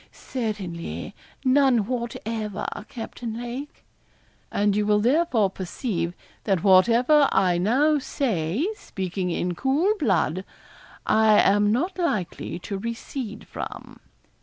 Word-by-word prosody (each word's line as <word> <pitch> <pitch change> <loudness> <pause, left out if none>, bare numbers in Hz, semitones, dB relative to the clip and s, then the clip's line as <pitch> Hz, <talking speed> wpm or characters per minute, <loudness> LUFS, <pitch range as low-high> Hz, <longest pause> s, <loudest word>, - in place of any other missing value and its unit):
'Certainly; 205 -9 -5 0.3
none 260 -4 +4
whatever, 225 -3 -4 0.2
Captain 230 -1 -6
Lake.' 245 +4 -7 0.7
'And 205 0 +2
you 210 - +2
will 210 0 +3
therefore 240 - +2
perceive 180 -2 -3 0.3
that 195 -4 +1
whatever 240 +9 +5
I 180 -2 +3
now 280 - +3
say, 225 - -1
speaking 185 - -4
in 175 +1 -1
cool 280 - +2
blood, 185 - +1 0.6
I 220 -1 +5
am 205 +1 +4
not 350 - -1
likely 210 - -2
to 195 +3 -5
recede 230 0 -5
from.' - - -8
220 Hz, 110 wpm, -25 LUFS, 190-255 Hz, 0.7 s, whatever